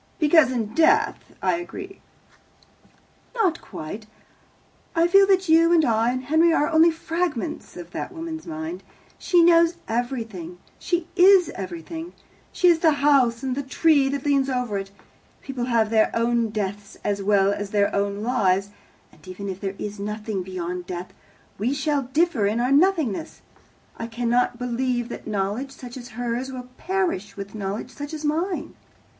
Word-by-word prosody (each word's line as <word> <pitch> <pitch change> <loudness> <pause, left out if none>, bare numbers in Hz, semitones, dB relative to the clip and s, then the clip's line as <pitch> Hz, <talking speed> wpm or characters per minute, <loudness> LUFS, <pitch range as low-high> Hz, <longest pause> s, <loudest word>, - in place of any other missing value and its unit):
"Because 305 -4 +5
in 225 -4 -2
death 420 - +2
I - - +2
agree." 375 +2 -8 1.3
"Not 370 -8 +1
quite. 205 +8 -8 0.9
I 330 +1 +4
feel 390 +2 +6
that 380 -1 +3
you 330 +1 +5
and 330 -3 +5
I 225 -1 +2
and 255 +1 -3
Henry 320 +5 +3
are 300 -2 +2
only 320 +1 +6
fragments 325 - -3
of 175 -1 -9
that - - -5
woman's 325 -2 -7
mind. 320 +2 -5 0.4
She 350 -2 +4
knows 335 0 +5
everything. 225 -8 -4 0.2
She 345 -1 -1
is 375 -1 +6
everything. 195 - -7 0.4
She 360 - +2
is 340 -2 +5
the 320 -2 +4
house, 275 -4 +3
and 260 -1 -1
the 280 - -2
tree 280 0 +3
that 280 0 -3
leans 275 -2 +2
over 250 -6 -1
it. 195 0 -7 0.5
People 260 -3 -4
have 230 -3 +1
their 220 -1 +4
own 230 0 +1
deaths 205 -1 -4
as 200 -1 -1
well 200 0 +3
as 205 0 -4
their 200 -1 +1
own 200 +1 -1
lives, 200 -5 +1 0.4
and - - -20
even 185 +2 -7
if 190 0 -6
there 195 -1 -3
is 210 0 -6
nothing 210 -1 -3
beyond 180 -1 -5
death, 180 0 -6 0.5
we 245 +7 0
shall 280 -2 -1
differ 300 -8 +2
in 215 +3 0
our 250 +2 +1
nothingness. 305 - +1 0.5
I 230 - -5
cannot 240 +1 0
believe 245 0 -1
that - - -8
knowledge 210 +6 -2
such 250 -2 -10
as 245 -2 -9
hers 245 +2 -2
will 250 -1 -8
perish 365 - -2
with 200 0 -7
knowledge 210 +3 -4
such 290 +3 -7
as 305 0 -6
mine. 335 +5 -1
250 Hz, 160 wpm, -24 LUFS, 210-320 Hz, 1.3 s, feel